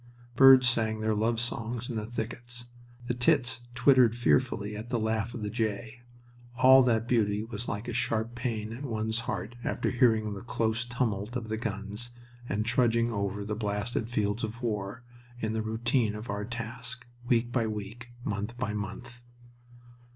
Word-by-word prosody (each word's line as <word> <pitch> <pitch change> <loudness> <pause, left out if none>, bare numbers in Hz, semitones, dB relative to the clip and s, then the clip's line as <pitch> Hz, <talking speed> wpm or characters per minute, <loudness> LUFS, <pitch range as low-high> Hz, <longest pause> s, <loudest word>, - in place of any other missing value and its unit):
Birds 130 -1 +8
sang 110 -2 +1
their 110 0 +1
love 110 +2 +1
songs 120 0 -3
in 120 - -4
the 110 -1 -3
thickets. 120 +1 -5 0.4
The 125 - -1
tits 120 -2 +2 0.2
twittered 125 -2 +5
fearfully 115 -3 +1
at 110 +3 -7
the 120 - +1
laugh 110 +1 -1
of 115 - -5
the 105 - -2
jay. 110 +1 -2 0.6
All 130 +1 +8
that 115 -2 +2
beauty 105 -3 +2
was 115 +1 -6
like 105 +4 -4
a 120 - -3
sharp 115 0 0
pain 115 -3 -3
at 125 +5 -7
one's 110 -3 -1
heart 115 - -3
after - - -1
hearing 110 -4 +3
the 100 - -7
close 115 -1 0
tumult 120 -2 -2
of 115 -3 -3
the 110 - -1
guns 105 +1 -3 0.4
and 105 +2 0
trudging 115 0 +2
over 100 -1 -2
the 105 - -2
blasted 105 +2 -2
fields 105 -1 0
of 115 +3 -4
war, 105 0 -3 0.4
in 110 -1 -1
the 110 - 0
routine 110 0 0
of 105 0 -5
our 100 0 -3
task, 120 +1 -5 0.2
week 120 -1 +2
by 120 -3 +1
week, 110 +3 -6 0.2
month 105 +3 -3
by 120 -4 -2
month. 105 +4 -6
115 Hz, 170 wpm, -29 LUFS, 110-120 Hz, 0.6 s, Birds